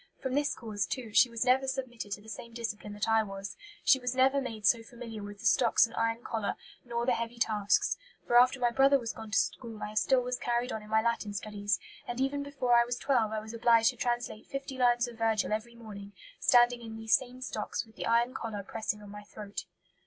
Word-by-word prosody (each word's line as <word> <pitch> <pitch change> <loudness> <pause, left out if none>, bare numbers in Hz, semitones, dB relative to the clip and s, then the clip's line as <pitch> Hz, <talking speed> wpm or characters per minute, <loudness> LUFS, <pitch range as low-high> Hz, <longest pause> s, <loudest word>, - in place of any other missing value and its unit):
From 260 -1 -4
this 290 +1 +1
cause, 210 -5 -3
too, 240 -5 -5
she 250 - +6
was 230 +1 -2
never 260 +1 +3
submitted 255 -5 -4
to 205 - -6
the 220 - -17
same 235 +1 -8
discipline 215 -3 -5
that 205 +2 -2
I 225 0 +4
was; 195 -2 -6 0.3
she 265 - +5
was 250 0 -2
never 265 +2 +4
made 225 -5 -5
so 230 +4 +5
familiar 230 -2 -9
with 205 0 -9
the - - -9
stocks 235 +1 +5
and 230 - -11
iron 230 +1 -1
collar, 220 -3 -2 0.3
nor 235 -1 -2
the 255 - +3
heavy 230 +1 -3
tasks; 215 - +1 0.3
for 240 - 0
after 255 +2 +4
my 240 -1 +2
brother 275 +3 +5
was 235 -3 -4
gone 220 -1 -9
to 220 - +1
school 230 -3 -1
I 210 - -5
still 230 +5 +3
was 250 0 -3
carried 240 +1 -1
on 220 - -4
in 210 - -13
my 220 0 +3
Latin 230 -3 -1
studies, 205 0 -1 0.3
and 240 +1 -4
even 270 +2 0
before 275 -4 -1
I 235 0 +7
was 240 +1 -3
twelve 245 -6 +1
I 215 -1 -2
was 220 +1 -9
obliged 230 0 +4
to - - -15
translate 240 -2 -2
fifty 275 -1 -5
lines 245 -1 +3
of 235 -1 -11
Virgil 220 -2 +1
every 230 +2 -4
morning, 205 -3 -10 0.3
standing 240 0 +5
in 225 -1 -8
these 225 0 -1
same 255 -1 +1
stocks, 235 -3 -3
with 220 - -21
the - - -4
iron 235 +2 +3
collar 210 -3 -5
pressing 210 0 -4
on 205 - -11
my 210 0 -8
throat." 205 0 -8
230 Hz, 235 wpm, -30 LUFS, 215-250 Hz, 0.3 s, I